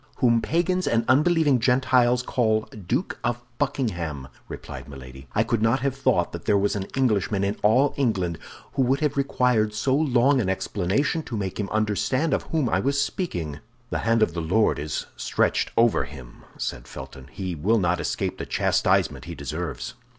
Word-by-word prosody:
"Whom 115 -3 +3
Pagans 180 +5 0
and 115 0 +2
unbelieving 150 0 +4
Gentiles 125 0 +3
call 110 -4 +1
Duke 110 - -3
of 120 -1 0 0.2
Buckingham," 85 - -2 0.2
replied - - -8
Milady. 65 0 -11
"I 105 - +4
could 115 -1 -1
not 115 +4 +2
have 135 0 0
thought 135 - +1
that - - -8
there 100 - +3
was 100 +1 +1
an 100 -1 -3
Englishman 105 -6 +1
in 100 +1 0
all 125 +7 +4
England 95 - 0 0.3
who - - 0
would 130 +3 +2
have 150 -1 +1
required 125 -6 +1
so 130 +5 +1
long 135 -2 +3
an 95 - -1
explanation 100 - 0
to 120 -7 -5
make 95 -1 -4
him 100 - -2
understand 110 +8 0
of - - +1
whom 155 -5 +1
I 95 - +1
was 140 +6 0
speaking." 85 - -2 0.3
"The - - -1
hand 115 -1 +2
of 85 - 0
the 85 - -3
Lord 95 +5 +2
is 75 +1 -3
stretched - - 0
over 115 -1 +4
him," 65 -5 -12
said - - -4
Felton; 65 0 -10
"he 95 +1 -5
will 100 +9 +1
not 90 -3 +1
escape - - -2
the - - -5
chastisement - - +1
he - - -7
deserves." 75 -6 -5
115 Hz, 180 wpm, -25 LUFS, 95-130 Hz, 0.3 s, unbelieving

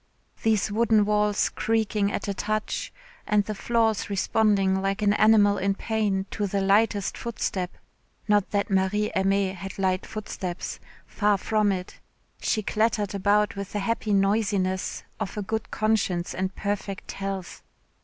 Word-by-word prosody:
These 215 -2 +2
wooden 220 -1 +3
walls 210 0 +2
creaking 215 -2 0
at - - -3
a 200 - -1
touch, 215 +2 -2 0.4
and 210 -1 +3
the 215 - -3
floors 225 0 0
responding 195 -1 +2
like 195 +2 -1
an 205 0 +4
animal 210 -1 +5
in 195 +1 +1
pain 205 -3 -1
to 205 -1 -1
the 200 +1 -1
lightest 200 +1 +2
footstep. 195 -5 -3 0.6
Not 205 -2 +3
that 200 0 -1
Marie 195 +2 +1
Aimée 195 0 +2
had 190 0 -8
light 185 -1 0
footsteps 195 -4 -5 0.3
far 205 -1 +1
from 210 +1 +1
it. 185 -1 -5 0.4
She 215 - 0
clattered 215 -1 0
about 205 +1 +2
with 200 -1 -6
the 205 - -1
happy 220 +1 -1
noisiness 195 -2 +1 0.2
of 215 -1 -4
a 210 - -1
good 220 +2 -3
conscience 200 -5 0
and 190 0 -3
perfect 200 -1 -3
health. 195 -2 -5
205 Hz, 145 wpm, -26 LUFS, 195-215 Hz, 0.6 s, animal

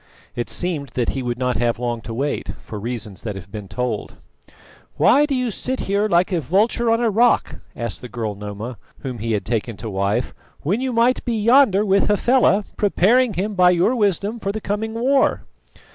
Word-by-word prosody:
It 120 - -3
seemed 160 -6 -2
that 120 -3 0
he 135 - -2
would 120 -1 -3
not 125 -2 0
have 120 0 +1
long 120 -1 -3
to 115 +1 -7
wait, 140 +4 -2 0.2
for 105 - -6
reasons 110 -3 -5
that 105 -4 -5
have 95 0 -10
been 105 -2 -7
told. 110 +1 -3 0.8
"Why 290 +3 +5
do 280 - -1
you 250 -2 -1
sit 260 +5 -3
here 200 +2 +1
like 175 +2 +3
a 175 -3 0
vulture 210 - +1
on 230 0 +3
a 230 -2 +2
rock," 235 +4 +2 0.2
asked 115 -2 -4
the 125 - -8
girl 110 -3 -3
Noma, 105 +4 -7 0.2
whom 125 -3 -5
he 115 +1 -2
had 105 - -1
taken 115 -1 -2
to 110 -2 -6
wife, 100 +5 -1 0.3
"when 195 - 0
you 260 -1 -1
might 240 +2 +2
be 235 -2 -1
yonder 215 -3 +4
with 195 0 +3
Hafela, 210 -1 +3
preparing 215 +3 +3
him 205 +4 -2
by 180 -2 +5
your 180 +8 +2
wisdom 205 +1 0
for 200 - -2
the 220 - -4
coming 220 +2 -3
war?" 265 +4 +2
180 Hz, 200 wpm, -21 LUFS, -, 0.8 s, Why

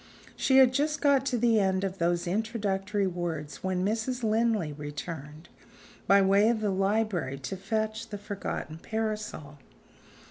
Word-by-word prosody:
She 265 - +3
had 260 -1 +7
just 295 +2 0
got 275 -2 +3
to 250 - +1
the 230 -1 +3
end 190 -1 +1
of 195 0 -3
those 170 +1 +1
introductory 205 0 -1
words 165 -6 -4
when 185 -1 0
Mrs. 230 +4 -1
Linley 220 -7 +1
returned, 150 +1 -7 0.6
by 195 +1 +6
way 200 +3 +4
of 235 -2 +1
the 210 -2 0
library, 195 -7 0
to 140 +8 -5
fetch 220 +3 -2
the 205 - -5
forgotten 200 -5 -5
parasol. 210 -9 -4
200 Hz, 145 wpm, -28 LUFS, 175-225 Hz, 0.6 s, had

